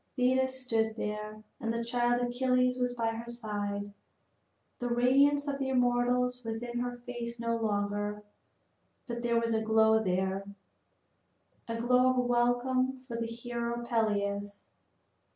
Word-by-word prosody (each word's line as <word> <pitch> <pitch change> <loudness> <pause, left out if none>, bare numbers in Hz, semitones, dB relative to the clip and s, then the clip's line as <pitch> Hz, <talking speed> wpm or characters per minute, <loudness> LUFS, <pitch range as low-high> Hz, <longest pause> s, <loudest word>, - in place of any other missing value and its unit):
Thetis 260 +1 +2
stood 220 -2 +1
there, 210 0 -5 0.2
and 230 -4 -2
the 230 0 -2
child 240 0 +1
Achilles 250 +1 +1
was 245 0 0
by 230 -1 0
her 230 +1 -6
side. 205 -3 -3 0.9
The 245 - -2
radiance 275 +4 +4
of 280 -1 -2
the 270 -1 -1
immortals 250 0 +2
was 225 0 -4
in 240 0 -3
her 245 0 -3
face 240 -1 -6
no 230 0 0
longer, 205 -1 -1 0.8
but 235 -1 -4
there 235 -1 +2
was 230 0 0
a 220 - +1
glow 220 0 +4
there, 190 +1 0 1.2
a 230 - -3
glow 250 +2 +4
of 255 - +1
welcome 250 +2 +2
for 255 -2 -9
the 230 0 -2
hero 235 0 -4
Peleus. 205 -3 -1
235 Hz, 140 wpm, -31 LUFS, 220-250 Hz, 1.2 s, radiance